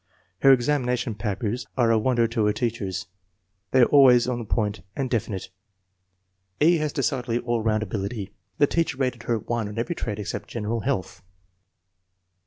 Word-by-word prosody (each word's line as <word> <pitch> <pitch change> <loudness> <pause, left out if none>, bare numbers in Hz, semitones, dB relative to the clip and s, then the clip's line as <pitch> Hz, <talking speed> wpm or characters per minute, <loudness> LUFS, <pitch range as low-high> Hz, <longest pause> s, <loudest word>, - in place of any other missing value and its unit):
Her 135 - +6
examination 125 -2 +1
papers 105 +3 -3
are 120 -3 +4
a 115 - +4
wonder 120 0 +2
to 115 -2 0
her 105 - +2
teachers. 105 -7 -3 0.6
They 130 - +4
are - - +8
always 130 -4 +6
to 125 - -1
the 120 -1 -5
point 105 -1 -1
and 135 -2 -2
definite. 105 -5 -2 1.1
E. 170 +3 +5
has 155 -1 -1
decidedly 125 -3 -1
all 120 -1 -1
round 110 0 +1
ability.' 100 +1 -4
5 - - -25 0.2
The 145 - +5
teacher 165 -3 -1
rated 125 -3 -2
her 115 - +3
1 115 0 -3
on 105 +2 -8
every 120 +9 -1
trait 110 -10 -4
except 105 -1 -5
general 115 0 -2
health. 115 -6 -3
120 Hz, 170 wpm, -25 LUFS, 110-130 Hz, 1.1 s, are